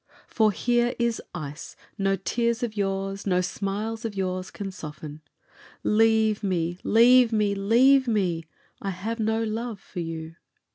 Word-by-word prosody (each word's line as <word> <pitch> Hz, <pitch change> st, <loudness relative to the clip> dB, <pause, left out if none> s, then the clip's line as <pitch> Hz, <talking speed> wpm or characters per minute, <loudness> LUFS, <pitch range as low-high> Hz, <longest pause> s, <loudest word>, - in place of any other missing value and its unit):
For 220 Hz, -2 st, +2 dB
here 240 Hz, +3 st, +1 dB
is 235 Hz, -1 st, 0 dB
ice 150 Hz, -2 st, -7 dB, 0.2 s
no 195 Hz, 0 st, +1 dB
tears 235 Hz, +5 st, -1 dB
of 225 Hz, -3 st, -3 dB
yours, 195 Hz, 0 st, -2 dB
no 180 Hz, -2 st, +3 dB
smiles 205 Hz, +5 st, -3 dB
of 220 Hz, -3 st, -4 dB
yours 185 Hz, -1 st, -2 dB
can 195 Hz, -1 st, -6 dB
soften: 155 Hz, -3 st, -9 dB, 0.6 s
Leave 220 Hz, -1 st, +3 dB
me, 175 Hz, -3 st, -1 dB
leave 240 Hz, +2 st, +6 dB
me, 210 Hz, -2 st, +2 dB
leave 250 Hz, +7 st, +4 dB
me, 180 Hz, -7 st, 0 dB, 0.4 s
I 200 Hz, -, -3 dB
have 210 Hz, +5 st, -4 dB
no 220 Hz, +1 st, +1 dB
love 225 Hz, 0 st, -3 dB
for 195 Hz, -, -9 dB
you! 165 Hz, -1 st, -6 dB
205 Hz, 145 wpm, -26 LUFS, 185-225 Hz, 0.6 s, leave